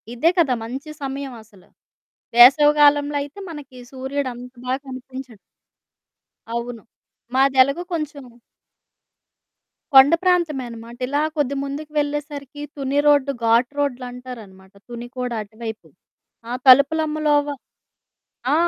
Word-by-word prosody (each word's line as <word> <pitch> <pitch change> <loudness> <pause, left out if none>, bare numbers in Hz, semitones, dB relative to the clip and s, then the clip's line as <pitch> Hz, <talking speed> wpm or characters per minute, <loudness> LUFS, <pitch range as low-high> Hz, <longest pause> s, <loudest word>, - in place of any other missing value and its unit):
ఇదే 295 +8 +3
కదా! 295 -7 +3
మంచి 265 +6 -7
సమయవసల. 250 -8 -7 0.7
వేసవి 275 +5 +8
గాలంలో 290 0 +4
అయితే 290 +7 -11
మనకి 290 -5 -10
సూర్యుడు 265 +1 -3
అంత 250 +1 -11
బాగా 260 +1 0
కనిపించడు. 255 -2 -9 1.2
అవును. 235 -1 -5 0.5
మాదెలగు 270 +4 +3
కొంచుం 300 -3 -4 1.7
కొండ 270 +3 +9
ప్రాంతమే 340 -7 +1
అనమాట. 230 0 -10
ఇలా 285 +3 0 0.2
కొద్ది 280 -2 0
ముందుకు 290 +2 -6
వెళ్ళేసరికీ 290 -1 -4
తుని 275 0 -2
రోడ్డు, 285 -2 +4
ఘాట్ 235 +3 +3
రోడ్లంటారనమాట. 245 -8 -6 0.2
తుని 240 0 -7
కూడా 250 -1 -3
అటువైపు. 220 +1 -8 0.6
ఆ - - -2
తలుపులమ్మలోవ 295 +2 +4 1.1
ఆ! - - +5
270 Hz, 105 wpm, -21 LUFS, 245-290 Hz, 1.7 s, కొండ